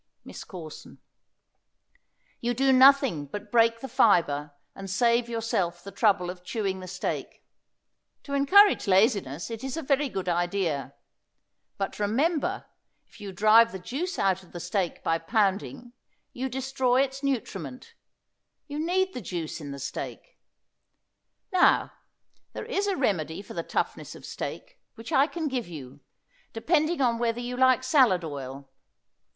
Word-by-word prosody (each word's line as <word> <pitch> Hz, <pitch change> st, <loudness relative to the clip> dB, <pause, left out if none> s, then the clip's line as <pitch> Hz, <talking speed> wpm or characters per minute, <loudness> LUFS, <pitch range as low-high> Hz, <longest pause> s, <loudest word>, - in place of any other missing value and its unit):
MISS -, -, -9 dB
CORSON. 165 Hz, -5 st, -10 dB, 1.4 s
You 240 Hz, +1 st, -1 dB
do 270 Hz, +2 st, +3 dB
nothing 260 Hz, -, +5 dB
but 205 Hz, +7 st, -8 dB
break 230 Hz, -1 st, +3 dB
the 270 Hz, -, -5 dB
fibre 150 Hz, -, +2 dB, 0.2 s
and 195 Hz, 0 st, -8 dB
save 235 Hz, +4 st, +2 dB
yourself 190 Hz, -7 st, -2 dB
the 200 Hz, -, -8 dB
trouble 195 Hz, -3 st, +2 dB
of 180 Hz, -1 st, -13 dB
chewing 190 Hz, 0 st, -2 dB
the 185 Hz, -, -8 dB
steak. 185 Hz, 0 st, -5 dB, 0.8 s
To 280 Hz, -, -7 dB
encourage 380 Hz, -, +5 dB
laziness 190 Hz, -, +2 dB
it 225 Hz, +2 st, -6 dB
is 265 Hz, +3 st, -4 dB
a 325 Hz, -, -3 dB
very 275 Hz, 0 st, +1 dB
good 190 Hz, -5 st, -4 dB
idea. 175 Hz, -4 st, -1 dB, 0.8 s
But 195 Hz, 0 st, -4 dB
remember, 275 Hz, +10 st, 0 dB, 0.4 s
if -, -, -18 dB
you 200 Hz, -1 st, -6 dB
drive 215 Hz, +4 st, +5 dB
the 190 Hz, -, -5 dB
juice 280 Hz, -, -4 dB
out 190 Hz, -1 st, +1 dB
of 185 Hz, -, -20 dB
the 175 Hz, -, -6 dB
steak 175 Hz, 0 st, -2 dB
by 165 Hz, 0 st, +1 dB
pounding 215 Hz, +5 st, -1 dB, 0.4 s
you 265 Hz, +1 st, -3 dB
destroy 265 Hz, 0 st, +1 dB
its 270 Hz, 0 st, -5 dB
nutriment. 195 Hz, -, -4 dB, 0.7 s
You 290 Hz, 0 st, -5 dB
need 375 Hz, +3 st, +1 dB
the 250 Hz, -, -5 dB
juice 175 Hz, -4 st, -5 dB
in 145 Hz, -, -7 dB
the 140 Hz, -, -6 dB
steak. 140 Hz, -, -7 dB, 1.1 s
Now, 365 Hz, -, +4 dB, 0.6 s
there -, -, -6 dB
is 405 Hz, +1 st, -1 dB
a 395 Hz, -, 0 dB
remedy 185 Hz, -, -1 dB
for -, -, -10 dB
the 170 Hz, -, -2 dB
toughness -, -, -3 dB
of -, -, -12 dB
steak, -, -, -7 dB, 0.2 s
which 225 Hz, +6 st, -9 dB
I 280 Hz, -1 st, +4 dB
can 325 Hz, -2 st, -4 dB
give 255 Hz, -6 st, -3 dB
you, 140 Hz, -5 st, -10 dB, 0.5 s
depending 310 Hz, +6 st, +1 dB
upon 235 Hz, -3 st, +2 dB
whether 235 Hz, 0 st, 0 dB
you 245 Hz, +1 st, -4 dB
like 255 Hz, 0 st, +4 dB
salad 255 Hz, -, +4 dB
oil. 140 Hz, -2 st, -7 dB
225 Hz, 150 wpm, -27 LUFS, 180-265 Hz, 1.4 s, nothing